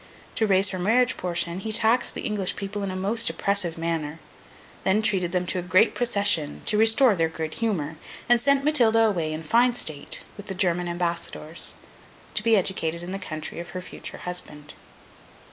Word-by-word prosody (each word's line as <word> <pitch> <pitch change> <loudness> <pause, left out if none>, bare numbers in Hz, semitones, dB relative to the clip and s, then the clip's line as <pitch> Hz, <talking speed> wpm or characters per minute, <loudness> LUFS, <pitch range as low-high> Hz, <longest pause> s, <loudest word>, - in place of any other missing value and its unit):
To 220 - +1
raise 195 0 +3
her 185 - -4
marriage 230 +7 +2
portion, 175 0 -2
he 220 +3 -4
taxed 230 +3 +2
the - - -5
English 205 -3 -1
people 205 +1 -5
in 200 - -2
a 185 - -4
most 205 +4 +2
oppressive 175 0 -1
manner; 165 -2 -3 0.7
then 205 +3 +2
treated 185 -5 +1
them 180 0 0
to 180 - -1
a - - -2
great 185 +5 +3
procession, 200 -11 +1
to 210 - +1
restore 225 +1 +5
their 165 -2 +1
good 160 -1 -5
humour; 165 -9 -2 0.3
and 240 -1 +4
sent 280 +1 +2
Matilda 235 -7 +4
away, 180 -8 +1
in 155 +1 -5
fine 240 +8 +3
state, 155 -10 -2
with 205 0 -10
the 190 - -5
German 180 -2 +1
ambassadors, 170 -2 -3 0.6
to - - 0
be 225 0 +4
educated 170 -3 -1
in 175 - -6
the 195 - -4
country 155 -4 -6
of 175 0 -7
her - - -4
future - - -8
husband. 150 -4 -6
185 Hz, 185 wpm, -25 LUFS, 170-220 Hz, 0.7 s, restore